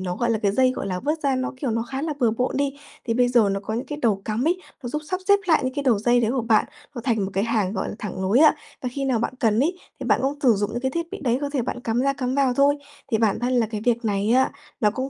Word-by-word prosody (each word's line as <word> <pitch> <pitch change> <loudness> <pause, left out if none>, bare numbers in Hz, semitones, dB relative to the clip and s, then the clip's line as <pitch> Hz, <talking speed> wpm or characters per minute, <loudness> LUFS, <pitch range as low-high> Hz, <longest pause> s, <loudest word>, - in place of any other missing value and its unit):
nó, 180 -1 -3
gọi 235 -1 0
là, 225 - +1
cái 200 -2 +1
dây, 255 +3 +3
gọi 200 - -4
là, 185 -1 -3
vớt 300 +4 -1
ra, 270 -2 +1
nó, 255 0 -2
kiểu, 260 -2 -2
nó 225 +1 0
khá 265 +4 -5
là 315 -1 -1
bừa 235 -3 +4
bộn 250 +4 -1
đi, 280 -1 0 0.3
thì 230 - -1
bây 245 +1 +3
giờ 235 -5 +4
nó 195 0 -1
có 215 +2 -4
những 240 - -3
cái 295 0 -5
đầu 200 -4 +1
cắm 220 +3 -1
ấy, 355 +2 +2 0.2
nó 245 - -4
giúp 300 +5 -3
sắp 370 - -1
xếp 405 - +6
lại 320 - +4
những 255 +1 -2
cái 285 - -2
đầu 245 -7 +3
dây 240 +3 +3
đấy 230 -1 +1
của 255 -2 0
bạn. 220 -2 +3 0.3
Nó 240 - -4
thành 220 -6 +1
một 190 - -4
cái 195 +2 0
hàng, 215 -4 0
gọi 190 - -2
là, - - -5
thẳng 190 -3 -5
nối 195 +6 +3
ấy, 305 +1 +7 0.3
và 255 - -1
khi 275 0 -3
nào 255 -4 +1
bạn 235 - -2
cần 225 -1 +3
ấy, 355 +6 0 0.2
thì - - -4
bạn - - +3
cũng 280 +2 -1
thử 250 -5 +5
dụng 205 +1 -1
những 240 - -3
cái 265 0 -1
thiết 335 +3 -2
bị 400 - -6
đấy, 250 -3 +1
có 285 - -2
thể 275 -4 -1
bạn 245 - -4
cắm 230 +1 0
ra, 275 +1 +2
cắm 255 -1 -2
vào 270 -3 +2
thôi. 285 +2 +4 0.4
Thì 220 - +3
bản 220 -3 +2
thân 250 +1 0
là 240 -3 +3
cái 215 -1 -5
việc 235 -1 +1
này 205 0 0
á, 260 +2 +3 0.3
nó 210 -2 +4
cũng 260 +4 -3
245 Hz, 330 wpm, -23 LUFS, 220-270 Hz, 0.4 s, ấy